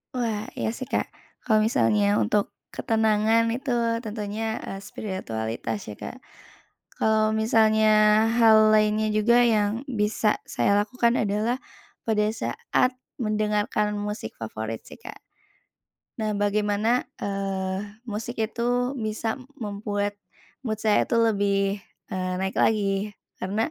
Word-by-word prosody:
Wah, 225 -4 -1 0.2
iya 225 - -1
sih, 260 - -5
Kak. - - 0 0.4
Kalau 215 -1 +4
misalnya 110 - +3
untuk 155 - +1 0.2
ketenangan 220 +1 +2
itu 255 +3 -2 0.3
tentunya, 215 +1 -3
eee, 195 +1 -7
spiritualitas 115 - -4
ya, 105 - -6
Kak. - - -8 0.8
Kalau 215 0 +3
misalnya 220 -1 +4
hal 215 -1 +6
lainnya 215 0 +3
juga 235 +3 +4
yang 220 +4 +1
bisa, 210 -3 0
saya 200 - +1
lakukan 235 +3 +2
adalah 215 +4 0 0.4
pada 210 -2 +1
saat 255 - 0 0.3
mendengarkan 210 -1 0
musik 205 - -4
favorit 110 0 -5
sih, - - -13
Kak. - - -11 1.0
Nah, 215 -1 -1
bagaimana, 210 +3 +1 0.2
eee, 195 +2 -3
musik 225 +1 -5
itu 245 +3 0
bisa 220 +2 -2 0.2
membuat 205 -3 -3 0.5
mood 215 0 -3
saya 215 -1 +3
itu - - -1
lebih, 200 -3 +2 0.3
eee, 185 -1 -2
naik 190 - -2
lagi, 205 -1 +1 0.2
karena 205 +4 -1
215 Hz, 115 wpm, -25 LUFS, 200-220 Hz, 1.0 s, hal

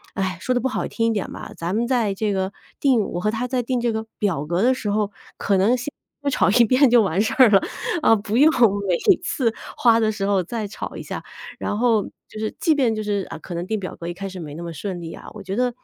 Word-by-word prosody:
唉， 190 -3 -1
说 255 - 0
得 245 - +1
不 265 - 0
好 260 - -2
听 230 -1 -1
一 230 - +2
点 205 -3 -3
吧， - - -8
咱 170 +3 -3
们 235 +2 0
在 235 -6 +1
这 205 +1 -1
个 190 0 -1 0.3
定 265 -5 +4
我 175 - -3
和 210 - +1
他 230 +3 -2
在 250 -1 -1
定 250 +1 -1
这 235 -1 0
个 220 0 -3
表 180 -9 0
格 175 +4 0
的 255 +3 +4
时 210 -5 -3
候， 210 0 0 0.3
可 200 - +1
能 205 +6 +4
先 250 +4 -5 0.4
吵 - - +3
一 235 +4 +6
遍 255 +5 +5
就 240 -1 +6
完 190 -3 0
事 220 - 0 0.2
了， 195 -2 +6 0.4
啊， 225 - +6
不 210 +2 -2
用 300 +4 +7 0.4
每 180 - +3 0.3
次 255 -8 0 0.2
花 230 -2 +4
的 220 -1 +2
时 205 -2 -3
候 200 -2 +2
再 215 +3 -4
吵 200 - -7
一 - - -6
下。 - - -5 0.4
然 - - -2
后 230 -4 +3 0.3
就 215 - -9
是 215 0 -3
即 320 -3 +3
便 255 -6 +2
就 215 - -3
是， 205 -2 -1
啊， - - -6
可 175 +2 -7
能 170 +1 -3
定 220 - -1
表 185 - -6
格 170 - -7
一 175 - -3
开 195 +2 -6
始 190 -1 -8
那 155 0 -7
么 170 - -5
顺 175 +3 -5
利 165 -1 -7
啊， - - -11
我 215 - -9
觉 195 0 -4
得 250 -1 +1
215 Hz, 285 characters per minute, -22 LUFS, 190-240 Hz, 0.4 s, 用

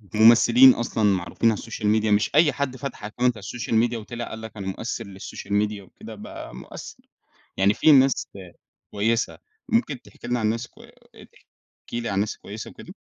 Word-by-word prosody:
ممثلين 120 +3 +7
أصلًا 115 -1 -2
معروفين 100 +3 +2
على 105 - -3
الsocial 115 -1 -6 0.2
media 110 - -1
مش 105 +6 +1
أي 155 0 +5
حد 135 -2 -3
فتح 130 -6 -6
account 105 - -13
على 125 - +5
الsocial 115 +2 -5 0.2
media 120 - -4
وطلع 120 +2 -6
قال 110 - -7
لك 110 0 -9
أنا 95 -1 -5
مؤثر 115 +3 -4
للsocial 100 0 -9
media 105 -1 -4
وكده 95 - -12
بقى - - -9
مؤثر. 65 - -10 0.5
يعني 100 +2 +4
فيه 155 - +4
ناس 135 -3 +4
آآ 95 -3 -11 0.4
كويسة. 115 +3 0 0.3
ممكن 150 - 0
تحكي - - -13
لنا 120 0 0
عن 110 - +1
ناس 115 +2 -2
الكو - - -18 0.5
تحكي 120 - -11
لي 115 - -3
على 100 - -2
الناس 100 +2 0
الكويسة 105 +2 -9
وكده؟ - - -12
115 Hz, 190 wpm, -24 LUFS, 105-120 Hz, 0.5 s, ممثلين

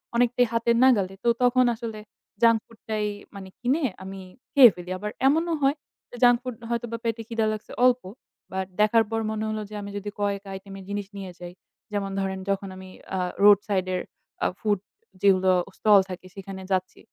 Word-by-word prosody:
অনেকটাই 245 +1 +3
হাতের 230 0 +2
নাগালে। 205 -8 +4
তো - - -1 0.2
তখন 250 0 +4
আসলে 220 -1 -6 0.4
junk 230 -1 +6
food 230 -1 -19
টাই 215 -1 0 0.3
মানে 190 -1 -8
কিনে 270 +6 +1 0.2
আমি 195 0 -7 0.3
খেয়ে 265 -4 +10
ফেলি। 180 0 -9
আবার 210 +2 -4 0.2
এমনও 325 +4 +2
হয় 275 +2 +4 0.5
junk 245 -1 +7
food 250 -2 -5
হয়তোবা 235 -1 -2
পেটে 230 0 -1
খিদা 225 -1 0
লাগছে 215 - -8
অল্প 250 0 +4 0.5
but 190 0 -2
দেখার 225 +1 +5
পর 225 - 0
মনে 215 0 -2
হলো 215 0 -2
যে 215 - -8
আমি 200 - -7
যদি 205 +1 -5
কয়েকটা 200 -1 -2
item 195 +1 -12
এর 190 - -10
জিনিস 205 -1 -3
নিয়ে 190 -2 -6
যাই। 175 0 -8 0.4
যেমন 200 -1 -2
ধরেন 190 -1 -2
যখন 195 0 -1
আমি 190 0 -10 0.3
আ - - 0 0.2
road 205 -1 +8
side 190 -2 0
এর 180 - 0 0.5
আ - - +5
food 205 -3 +1 0.4
যেগুলো 190 -2 +4 0.3
stall 210 -2 +6
থাকে 185 0 -7
সেখানে 195 -1 -8
যাচ্ছি। 185 0 -1
210 Hz, 185 wpm, -25 LUFS, 195-235 Hz, 0.5 s, খেয়ে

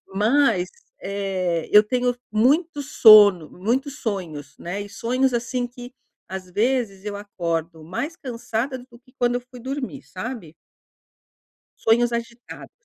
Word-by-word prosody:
Mas, 215 -3 +2 0.3
eh, 190 -4 -2
eu 210 0 +9
tenho 245 +2 0 0.2
muito 290 +7 +2
sono 205 - +7
muitos 260 +9 -2
sonhos, 165 - -5
né. 180 +4 -5
E 205 - -9
sonhos 255 +4 0
assim 245 +1 -1
que, 245 +1 -11 0.3
às 185 -1 -7
vezes 215 -2 0
eu 205 -1 -4
acordo 170 -5 -4
mais 280 - -4
cansada 245 -2 -3
do 245 -1 -15
que 255 +1 -26
quando 245 0 +2
eu - - -3
fui 250 0 -14
dormir, 270 +1 -5
sabe? 185 -5 -7 1.2
Sonhos 235 +2 +3
agitados. 235 +1 -6
230 Hz, 130 wpm, -23 LUFS, 195-250 Hz, 1.2 s, eu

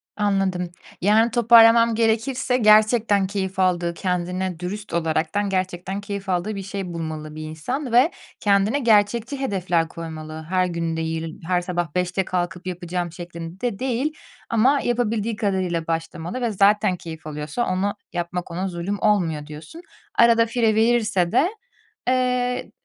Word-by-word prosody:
Anladım. 195 -4 0 0.3
Yani, 220 +5 +4
toparlamam 230 -1 +6
gerekirse 235 +3 +1
gerçekten 215 -2 +4
keyif 190 -1 -3
aldığı, 175 -2 +1
kendine 180 0 -2
dürüst 195 +3 -6
olaraktan 170 +4 0
gerçekten 185 +1 -2
keyif 200 -1 -6
aldığı 185 +4 -1
bir 195 - -5
şey 195 -2 -5
bulmalı 155 -2 -5
bir 155 - -6
insan 240 - -4
ve 250 +8 +5 0.3
kendine 205 +6 +2
gerçekçi 230 +2 +2
hedefler 180 -9 0
koymalı. 160 -1 -8
Her 185 0 +2
gün 165 -2 -2
değil, 160 0 -4
her 180 -1 +2
sabah 175 -3 -3
5'te 180 +1 0
kalkıp 180 0 -3
yapacağım 175 -1 -3
şeklinde 175 +5 -6
değil 260 +4 -1 0.4
ama 250 +5 +3
yapabildiği 230 -2 0
kadarıyla 185 -6 -1
başlamalı 165 +6 -3
ve 235 -2 0
zaten 205 0 +3
keyif 160 -2 -9
alıyorsa 150 +10 -3
onu 190 +2 0 0.2
yapmak 175 +1 -3
ona 185 +3 -2
zulüm 185 +3 -3
olmuyor 170 -8 +1
diyorsun. 155 - -10 0.3
Arada 230 -1 +5
fire 225 -2 +1
verirse 220 -6 +2
de, 335 - +3 0.6
eee, 250 -1 0
190 Hz, 135 wpm, -23 LUFS, 170-225 Hz, 0.6 s, toparlamam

